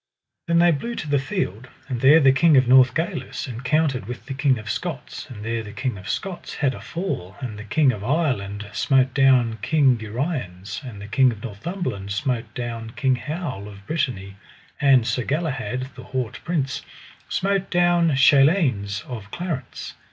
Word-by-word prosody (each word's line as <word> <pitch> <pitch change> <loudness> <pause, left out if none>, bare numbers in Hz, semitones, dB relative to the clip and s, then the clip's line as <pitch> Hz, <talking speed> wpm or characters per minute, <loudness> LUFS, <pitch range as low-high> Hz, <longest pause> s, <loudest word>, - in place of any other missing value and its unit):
Then 170 0 +3
they 170 0 +6
blew 235 +10 -3
to 155 - -5
the 145 -1 +2
field; 130 - -3 0.2
and 125 -4 -3
there 145 +4 +7
the 135 -3 +6
King 155 +2 +5
of 130 -1 +4
Northgalis 130 +8 +2
encountered 130 0 0
with 125 +1 -7
the 135 - -5
King 135 -1 +2
of 110 0 -9
Scots, 145 +2 -5
and 110 -4 -8
there 115 0 -1
the 105 -2 -9
King 130 -4 -2
of 95 +1 -9
Scots 190 -2 -4
had 140 -4 +1
a - - -9
fall; 165 - -4
and 125 -6 -5
the - - -7
King 135 +5 +3
of 105 -4 -6
Ireland 105 -8 -1
smote 130 -2 +2
down 125 -5 +4
King 135 -1 +3
Uriens; 110 - -4
and 120 -6 -8
the 100 - -8
King 130 +3 +4
of 105 -3 -9
Northumberland 115 - -4
smote 125 +2 -2
down 115 -2 -5
King 130 -2 +2
Howel 145 - -5
of 100 -1 -13
Brittany; 100 - -2 0.4
and 135 -4 +5
Sir 120 +1 0
Galahad, 135 -4 -2
the - - -11
haut 130 -4 -3
prince, 145 -6 -1 0.5
smote 195 0 0
down 175 -3 +3
Chaleins 135 - +4
of 110 -6 -8
Clarance. 165 -7 -5
130 Hz, 175 wpm, -23 LUFS, 110-155 Hz, 0.5 s, there